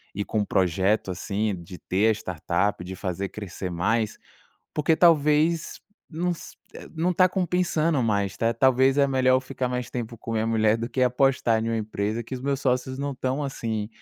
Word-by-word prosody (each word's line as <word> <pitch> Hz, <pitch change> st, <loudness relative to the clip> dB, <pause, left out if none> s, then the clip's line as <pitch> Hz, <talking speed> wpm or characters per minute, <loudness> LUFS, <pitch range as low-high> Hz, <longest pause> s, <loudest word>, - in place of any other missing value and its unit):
e 100 Hz, -, -1 dB
com 110 Hz, -, -1 dB
o -, -, -1 dB
projeto, 95 Hz, +3 st, +1 dB
assim, 100 Hz, +3 st, -2 dB
de 90 Hz, +1 st, -10 dB
ter 100 Hz, +4 st, +1 dB
a -, -, +5 dB
startup, 95 Hz, -1 st, -2 dB
de 95 Hz, +1 st, -7 dB
fazer 95 Hz, 0 st, -3 dB
crescer 95 Hz, -2 st, -6 dB
mais, 105 Hz, +5 st, 0 dB, 0.6 s
porque 155 Hz, +1 st, +2 dB
talvez 160 Hz, 0 st, +3 dB, 0.3 s
não 175 Hz, +2 st, -1 dB
se -, -, -12 dB, 0.4 s
não 175 Hz, +3 st, +1 dB
tá 185 Hz, +1 st, +4 dB
compensando 170 Hz, -5 st, +1 dB
mais, 100 Hz, -3 st, 0 dB
né, 115 Hz, +2 st, +1 dB
ta -, -, -14 dB
talvez 130 Hz, +3 st, +3 dB
é 140 Hz, -, +5 dB
melhor 130 Hz, -1 st, +3 dB
eu -, -, 0 dB
ficar 130 Hz, -1 st, -3 dB
mais 125 Hz, -1 st, -3 dB
tempo 115 Hz, -2 st, -5 dB
com 115 Hz, -, -6 dB
a -, -, -1 dB
minha 110 Hz, 0 st, 0 dB
mulher 110 Hz, -1 st, +3 dB
do 115 Hz, -, -3 dB
que 130 Hz, -, -3 dB
apostar 125 Hz, -3 st, +2 dB
em -, -, -1 dB
uma 115 Hz, -, 0 dB
empresa 110 Hz, +1 st, -2 dB
que 130 Hz, -, -6 dB
os 125 Hz, -, -6 dB
meus 140 Hz, 0 st, -1 dB
sócios 130 Hz, 0 st, 0 dB
não 140 Hz, 0 st, -2 dB
estão, 130 Hz, +2 st, -2 dB
assim, 110 Hz, -6 st, -3 dB
115 Hz, 200 wpm, -25 LUFS, 105-140 Hz, 0.6 s, a